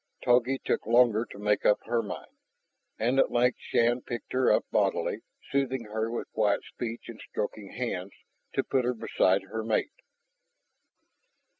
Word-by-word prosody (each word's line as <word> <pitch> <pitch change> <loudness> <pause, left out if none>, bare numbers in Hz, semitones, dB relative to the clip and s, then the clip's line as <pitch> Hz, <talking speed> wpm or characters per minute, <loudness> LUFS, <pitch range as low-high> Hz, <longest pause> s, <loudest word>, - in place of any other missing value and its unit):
Togi 125 +2 +3
took - - -2
longer 120 -1 +4
to 105 - -12
make 105 0 +1
up 105 - +4
her 115 0 +1
mind. 105 - -7 0.7
And 125 +4 +2
at - - +4
length 125 +1 +2
Shann 120 +2 +2
picked 120 -1 -6
her 130 0 +3
up - - +3
bodily, - - +1 0.3
soothing 130 -2 0
her 110 +1 -2
with 115 - -5
quiet 105 -2 +2
speech 115 -1 -6
and 115 -2 -9
stroking 105 -1 -4
hands, 100 -6 -3 0.4
to - - +1
put 130 - +1
her 125 +1 0
beside 95 -3 +2
her 110 +3 -5
mate. 110 -1 0
115 Hz, 155 wpm, -28 LUFS, 105-125 Hz, 0.7 s, longer